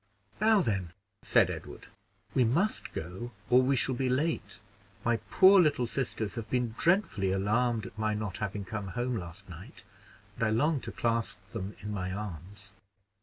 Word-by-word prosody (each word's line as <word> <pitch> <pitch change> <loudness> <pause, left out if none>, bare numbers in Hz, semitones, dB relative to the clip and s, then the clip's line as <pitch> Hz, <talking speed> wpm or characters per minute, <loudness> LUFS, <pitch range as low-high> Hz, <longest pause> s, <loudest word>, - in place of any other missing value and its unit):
"Now 215 -1 +5
then," 95 - -2 0.3
said - - +3
Edward, - - -8 0.5
"we 130 - +4
must 165 - 0
go, 90 +9 -6 0.2
or 125 +1 +7
we 135 +2 +2
shall 130 +1 +3
be 130 +1 -1
late. 150 +6 -1 0.5
My 120 0 +3
poor 190 0 +7
little 145 -6 +2
sisters 115 -4 -3
have 115 -3 -6
been 125 -3 0
dreadfully 165 - +2
alarmed 110 +4 +1
at 115 -2 -10
my 110 -1 0
not 105 -3 -4
having 100 -1 -3
come 105 -2 -5
home 125 0 0
last 90 0 -7
night, 90 +1 -11 0.5
and - - -2
I 110 - +3
long 145 +7 +2
to 115 - -6
clasp 115 -1 -1
them 105 -2 -5
in 105 0 -5
my 95 -2 -3
arms." 100 +1 -7
115 Hz, 170 wpm, -30 LUFS, 100-130 Hz, 0.5 s, or